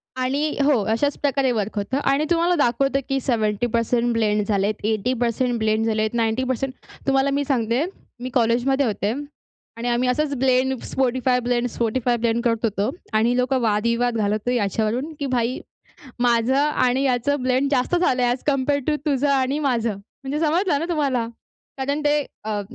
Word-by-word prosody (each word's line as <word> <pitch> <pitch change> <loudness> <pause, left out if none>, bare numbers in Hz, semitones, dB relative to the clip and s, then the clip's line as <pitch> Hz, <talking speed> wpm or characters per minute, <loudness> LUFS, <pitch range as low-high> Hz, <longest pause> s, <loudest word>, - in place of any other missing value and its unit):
आणि 275 +4 -1
हो, 275 -7 +3
अशाच 285 +6 0
प्रकारे 275 -2 +1
वर्क 220 -2 -2
होतं 205 +7 -1
आणि 290 +3 +1
तुम्हाला 345 +1 +3
दाखवतो, 275 -1 +1
की 270 - +1
70% 235 +1 0
ब्लेंड 210 -2 +1
झालेत, 205 0 0
80% 235 +3 0
ब्लेंड 220 0 +1
झालेत, 215 0 0
90% 255 +3 -1 0.3
तुम्हाला 270 0 +3
मी 285 +1 0
सांगते, 245 0 +1 0.4
मी 250 +1 -5
कॉलेजमध्ये 250 +3 +2
होते 210 -1 -1 0.7
आणि 235 +1 -4
आम्ही 245 +1 +1
असंच 295 +2 0
blend 260 +1 +2 0.2
Spotify 255 -1 +1
blend, 245 0 0
Spotify 240 +1 0
blend 230 0 +1
करत 230 -2 0
होतो 210 -1 0 0.3
आणि 235 +3 +2
लोकं 255 +1 +1
वादविवाद 235 +2 +1
घालत 210 +1 -1
ही 250 - +1
याच्यावरून, 225 - -1
की 285 - -2
भाई 240 +2 0 0.6
माझं 240 +1 +2
आणि 275 -3 +2
याचं 265 +2 +1
ब्लेंड 260 +2 +1
जास्त 265 +6 +1
झालंय 255 -8 +2
ऍज 245 - -3
कंपेयर 285 0 +1
टू 300 - +2
तुझं 285 -1 +1
आणि 275 +1 +1
माझं. 235 -6 0 0.3
म्हणजे 280 +3 -2
समजलं 335 -1 +1
ना 330 - -2
तुम्हाला? 275 -8 0 0.5
कारण 280 +3 -1
ते 295 0 +3 0.2
अ, 210 -1 -2
250 Hz, 160 wpm, -22 LUFS, 230-275 Hz, 0.7 s, हो